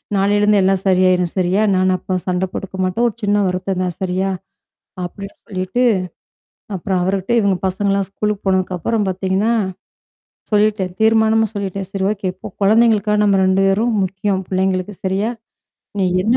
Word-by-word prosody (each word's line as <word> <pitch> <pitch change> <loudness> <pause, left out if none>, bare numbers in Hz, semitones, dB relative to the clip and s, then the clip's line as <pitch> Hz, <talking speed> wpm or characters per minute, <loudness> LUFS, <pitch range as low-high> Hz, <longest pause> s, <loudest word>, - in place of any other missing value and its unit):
நாளைலருந்து 205 +1 +3
எல்லாம் 190 0 +1
சரியாயிரும் 185 -2 +3
சரியா? 185 +2 +2
நான் 185 0 +2
அப்பா 185 +1 -3
சண்ட 180 0 0
போட்டுக்க 190 0 -6
மாட்டோம். 185 +6 0
ஒரு 215 - -11
சின்ன 205 0 +2
வருத்தம் 185 +1 -2
தான் 180 -2 -3
சரியா?" 190 +1 0 0.8
அப்படின்னு 195 +3 -8
சொல்லிட்டு. 190 +4 -2 0.9
அப்புறம் 185 +1 -1
அவருகிட்டே 190 +4 0
இவங்க 200 -3 +2
பசங்கலாம் 195 +1 0
ஸ்கூலுக்கு 210 0 -2
போனதுக்கப்புறம் 190 +3 0
பார்த்தீங்கன்னா. 190 +4 0 1.0
சொல்லிட்டேன். 210 -3 +2
தீர்மானமா 220 0 +4
சொல்லிட்டேன். 195 -1 -4
"சரி 195 -1 -2
ஓகே 200 -2 -3
இப்போ 185 - -10 0.2
குழந்தைங்களுக்கா 215 0 +4
நம்ம 200 -1 +3
2 190 +1 +2
பேரும் 220 +5 +1
முக்கியம் 190 +1 -2
பிள்ளைங்களுக்கு 190 +1 -1
சரியா? 195 +4 0 0.7
நீ 195 - +2 0.2
என்ன 225 +5 +2
195 Hz, 140 wpm, -18 LUFS, 185-205 Hz, 1.0 s, தீர்மானமா